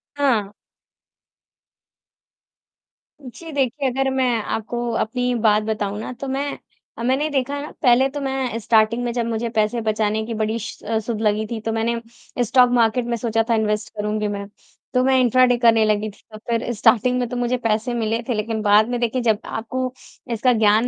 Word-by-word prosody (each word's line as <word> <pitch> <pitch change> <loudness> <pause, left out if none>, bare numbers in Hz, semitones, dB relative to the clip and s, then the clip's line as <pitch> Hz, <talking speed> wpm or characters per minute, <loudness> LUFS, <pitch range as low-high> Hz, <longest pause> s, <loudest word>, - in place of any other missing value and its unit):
हाँ। 235 -8 +1 2.7
जी, 300 +6 -10
देखिए, 270 -1 0
अगर 270 +2 0
मैं 260 -1 +1 0.2
आपको 240 +3 -3
अपनी 250 +2 -1
बात 215 -1 +4
बताऊँ 210 -2 -2
ना, 220 - -5
तो 275 +3 -7
मैं 275 +2 -2 0.4
अ, 230 - -5
मैंने 260 +4 +1
ये 310 - 0
देखा 280 0 -1
ना, 295 - -7
पहले 255 0 +5
तो 290 - -5
मैं 265 -3 -2
स्टार्टिंग 225 +2 +2
में 240 - -1
जब 235 -1 -1
मुझे 230 0 -2
पैसे 215 +2 +1
बचाने 215 0 0
की 230 - -4
बड़ी 220 +1 -1
श 220 - -8
अ, 225 +1 0
सुध 220 0 -4
लगी 215 0 +1
थी, 225 0 -4
तो 225 - -2
मैंने 230 +1 0 0.4
स्टॉक 250 +2 +4
मार्केट 235 0 +2
में, 240 0 -1
सोचा 225 -1 0
था, 230 - +4
इन्वेस्ट 210 -1 -1
करूँगी 210 0 -1
मैं। 200 -1 -4 0.5
तो 255 - +3
मैं 265 0 +3
इंट्राडे 250 0 +4
करने 230 -2 +4
लगी 215 0 +1
थी, 205 - -17
तो 215 - -9
फिर 235 +1 0
स्टार्टिंग 250 +3 +3
में 245 - -1
तो 250 - -4
मुझे 245 +1 0
पैसे 220 +3 0
मिले 225 -1 -1
थे, - - +2
लेकिन 220 0 -2
बाद 210 +1 +4
में, 245 -1 -1
देखिए, 240 +1 0
जब 220 -3 +2
आपको 255 +3 -3 0.4
इसका 250 +3 +2
ज्ञान 220 +1 +3
230 Hz, 190 wpm, -21 LUFS, 215-250 Hz, 2.7 s, पहले